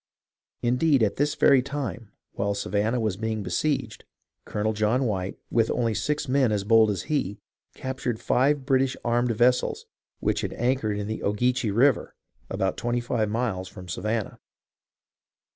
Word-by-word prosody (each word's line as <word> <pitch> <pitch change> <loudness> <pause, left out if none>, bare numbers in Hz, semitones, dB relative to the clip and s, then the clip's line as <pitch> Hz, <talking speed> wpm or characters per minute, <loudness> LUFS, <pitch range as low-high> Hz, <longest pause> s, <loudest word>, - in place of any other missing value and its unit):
Indeed, 125 +2 +3
at 105 -2 0
this 145 +1 +1
very 135 -2 +5
time, 125 -6 -5 0.2
while 100 0 -1
Savannah 105 +4 0
was 110 -4 -1
being 110 -1 -2
besieged. 110 +5 -1 0.4
Colonel 110 +1 -1
John 110 +5 +1
White, 95 -4 -2
with 115 -1 +2
only 115 -2 0
six 150 +7 -1
men 130 -3 +3
as 105 -2 0
bold 110 +1 +5
as 95 -4 -2
he, 130 -10 -1 0.4
captured 130 -3 -3
five 135 +2 +2
British 135 -1 +2
armed 120 +1 +2
vessels 120 +2 +2 0.3
which - - 0
had - - -3
anchored 120 -4 0
in 105 - -3
the 110 +1 -4
Ogeechee 120 +3 +1
River, 120 +6 +2 0.3
about 95 -1 -1
twenty 120 +1 -1
five 120 -3 -1
miles 105 -5 -2
from 90 0 -11
Savannah. 105 +5 -3
115 Hz, 150 wpm, -26 LUFS, 105-130 Hz, 0.4 s, very